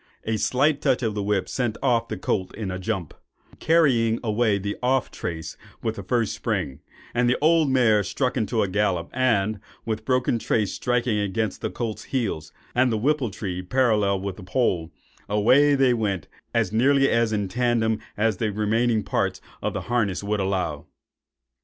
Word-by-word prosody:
A 110 0 -1
slight 140 +6 +2
touch 130 -3 +1
of 110 -2 0
the 105 - -2
whip 100 -1 0
sent 120 -4 -2
off 120 -3 +2
the 110 - -4
colt 95 0 -2
in 105 -3 -4
a 90 - -4
jump, 95 -5 -3 0.5
carrying 125 -9 +3
away 110 -2 +2
the 100 +1 -3
off 130 +1 +1
trace 80 -2 -5 0.3
with 110 -1 -1
the - - -6
first 115 -4 0
spring; 65 - -2 0.3
the 120 +1 +2
old 160 -1 +4
mare 115 -6 +4
struck 130 +6 -1
into 110 -2 +1
a - - 0
gallop, 95 -3 0
and, 110 -5 +1 0.3
with 110 -1 -1
the 110 - -27
broken 125 -2 +1
trace 105 -3 0
striking 120 -3 0
against 105 +1 -2
the - - -1
colt's 115 -3 -4
heels, 110 - -2 0.2
and 125 0 +3
the 110 - +1
whippletree 110 -8 -1
parallel 105 -2 +2
with 100 -1 -4
the 105 - -10
pole, 90 -5 0 0.4
away 130 +8 +4
they 135 -2 +4
went 100 -7 -1 0.2
as 110 -5 +1
nearly 135 +4 +4
in 110 -4 +1
a - - -3
tandem 115 0 +1 0.2
as 105 -1 +1
the 110 +1 -1
remaining 110 +2 +1
part - - -1 0.2
of - - -2
the - - -3
harness 110 -6 -1
would 105 +1 -1
allow. 95 -6 -2
110 Hz, 175 wpm, -24 LUFS, 100-125 Hz, 0.5 s, old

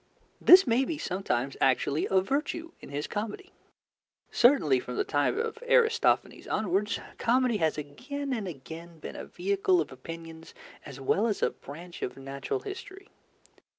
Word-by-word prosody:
This 375 +2 +9
may 245 +1 +3
be 310 +3 -3
sometimes 160 - -2
actually 135 +3 +2
a 190 -1 +4
virtue 300 - -2
in - - -11
his 145 +2 -3
comedy. 220 - -5 0.8
Certainly, 180 - +5
from 125 0 -6
the - - +2
time 145 - +1
of 455 0 -2
Aristophanes 485 -2 +2
onwards, 205 +1 0 0.2
comedy 245 -1 +2
has 160 -5 +1
again 265 - -5
and 220 -5 -3
again 165 +2 -9
been 155 - -8
a - - -6
vehicle 190 0 +1
of 155 - -2
opinions 165 +4 -9 0.3
as 140 -2 -9
well 195 - +2
as 210 - -1
a - - +3
branch 170 +5 -11
of - - -4
natural 135 - -4
history. 395 0 -9
195 Hz, 150 wpm, -29 LUFS, -, 0.8 s, This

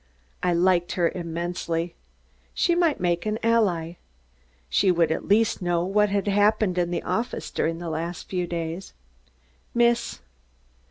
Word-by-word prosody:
I 180 - +1
liked 175 0 +2
her 170 -2 +1
immensely. 170 0 -3 0.6
She 345 - +2
might 340 -3 +2
make 175 +2 0
an 215 0 0
ally. 180 -8 +1 0.7
She 125 - +2
would 170 -3 +3
at - - -2
least 215 +1 +3
know 175 -1 +1
what 210 +2 +2
had 200 0 -1
happened 205 -2 +2
in 175 -1 +1
the 175 - -2
office 225 +7 -3
during 165 +1 -1
the 170 0 -6
last 165 +2 -4
few 180 -2 -2
days. 170 +2 -4 0.8
"Miss 235 0 +2
180 Hz, 145 wpm, -25 LUFS, 170-210 Hz, 0.8 s, would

